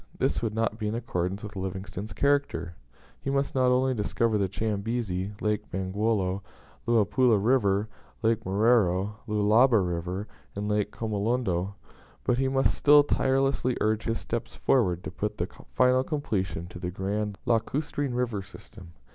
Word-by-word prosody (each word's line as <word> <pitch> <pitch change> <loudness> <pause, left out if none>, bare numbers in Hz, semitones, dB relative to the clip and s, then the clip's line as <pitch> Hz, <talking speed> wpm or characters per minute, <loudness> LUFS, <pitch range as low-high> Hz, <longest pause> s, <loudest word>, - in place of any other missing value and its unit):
This - - 0
would 110 -2 -2
not 115 -1 -1
be 105 - -2
in 105 - -1
accordance 95 -4 -2
with 105 0 -8
Livingstone's 95 +2 -5
character. 140 -8 0 0.5
He - - -3
must 140 0 0
not 130 -1 +3
only 130 +1 +3
discover 115 0 0
the 95 -1 +1
Chambezi, 105 -2 -2
Lake 105 0 -1
Bangweolo, 95 0 -1 0.5
Luapula 115 +1 +4
River, 105 -2 +2 0.4
Lake 110 0 +2
Moero, 100 -1 +2
Lualaba 110 +3 +4
River, 90 +2 -2 0.3
and 100 +1 -3
Lake 105 -1 0
Kamolondo, 105 -3 -1 0.5
but 125 0 +1
he 135 - +2
must 135 0 +2
still 145 0 +6
tirelessly 135 -2 +1
urge 110 0 0
his 115 0 -1
steps 115 0 -4
forward 90 -9 +2
to - - -5
put 105 0 -3
the 85 - 0 0.3
final 130 0 +4
completion 95 - -2
to 90 - -9
the 90 - -3
grand 100 +2 -2
lacustrine 130 +3 0
river 120 -5 -1
system. 95 -3 -13
105 Hz, 145 wpm, -27 LUFS, 95-125 Hz, 0.5 s, still